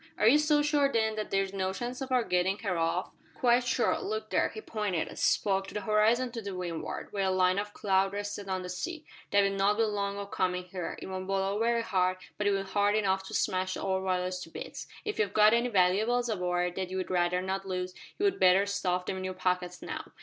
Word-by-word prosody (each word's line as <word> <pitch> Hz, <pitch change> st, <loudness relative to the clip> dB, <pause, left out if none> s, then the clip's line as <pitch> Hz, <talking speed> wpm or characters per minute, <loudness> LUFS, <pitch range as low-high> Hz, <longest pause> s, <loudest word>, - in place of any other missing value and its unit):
"Are 215 Hz, -, +3 dB
you 285 Hz, +6 st, +7 dB
so 300 Hz, -1 st, +3 dB
sure, 290 Hz, -1 st, +2 dB
then, 220 Hz, -2 st, +1 dB
that 215 Hz, 0 st, -3 dB
there 195 Hz, 0 st, +2 dB
is 195 Hz, 0 st, -7 dB
no 190 Hz, -1 st, -1 dB
chance 245 Hz, +5 st, -5 dB
of 265 Hz, -1 st, -5 dB
our 250 Hz, -2 st, +3 dB
getting 180 Hz, 0 st, +1 dB
her 195 Hz, -4 st, 0 dB
off?" 165 Hz, +2 st, 0 dB, 0.2 s
"Quite 245 Hz, 0 st, +3 dB
sure. 245 Hz, -, +1 dB
Look 435 Hz, +2 st, -4 dB
there." -, -, +2 dB
He -, -, -8 dB
pointed, 210 Hz, -, -2 dB
as -, -, -9 dB
he -, -, +4 dB
spoke, 195 Hz, -1 st, -1 dB
to -, -, -10 dB
the 210 Hz, -, -1 dB
horizon 220 Hz, +4 st, +2 dB
to 225 Hz, -4 st, -5 dB
windward, 175 Hz, -3 st, -5 dB
where 200 Hz, -1 st, 0 dB
a -, -, +2 dB
line 185 Hz, 0 st, +3 dB
of 205 Hz, 0 st, -4 dB
cloud 195 Hz, -1 st, +2 dB
rested 205 Hz, 0 st, -5 dB
on 185 Hz, -1 st, -1 dB
the -, -, -5 dB
sea. 315 Hz, -, -5 dB, 0.2 s
"That'll 200 Hz, -1 st, +3 dB
not 195 Hz, +1 st, +2 dB
be 225 Hz, -, +3 dB
long 200 Hz, -2 st, -1 dB
o' 200 Hz, -, -4 dB
comin' 180 Hz, -2 st, -1 dB
here. 180 Hz, -1 st, -5 dB
It -, -, -7 dB
won't 185 Hz, 0 st, -5 dB
blow 195 Hz, +1 st, 0 dB
very 230 Hz, 0 st, +2 dB
hard, 185 Hz, -3 st, +1 dB, 0.2 s
but 205 Hz, -, +1 dB
it'll 195 Hz, -1 st, +1 dB
be 195 Hz, -, -12 dB
hard 205 Hz, +1 st, +2 dB
enough 190 Hz, -3 st, +1 dB
to -, -, -6 dB
smash 185 Hz, -1 st, 0 dB
the -, -, -5 dB
old 190 Hz, -1 st, 0 dB
Walrus 185 Hz, -1 st, -1 dB
to 165 Hz, -, -8 dB
bits. -, -, -7 dB, 0.2 s
If 425 Hz, -, -3 dB
you've 205 Hz, -2 st, +1 dB
got 215 Hz, +1 st, +6 dB
any 235 Hz, +1 st, +2 dB
valooables 220 Hz, +5 st, +2 dB
aboard 180 Hz, -2 st, -1 dB
that 190 Hz, -1 st, -2 dB
you'd 185 Hz, 0 st, -3 dB
rather 180 Hz, 0 st, +2 dB
not 190 Hz, +1 st, -3 dB
lose, 180 Hz, -1 st, -3 dB, 0.2 s
you'd 400 Hz, -1 st, +1 dB
better 185 Hz, +1 st, +5 dB
stuff 185 Hz, -3 st, -1 dB
'em 190 Hz, -, -2 dB
in 185 Hz, -, -5 dB
your 185 Hz, 0 st, -4 dB
pockets 180 Hz, -1 st, -1 dB
now. -, -, -5 dB
195 Hz, 240 wpm, -30 LUFS, 185-215 Hz, 0.2 s, you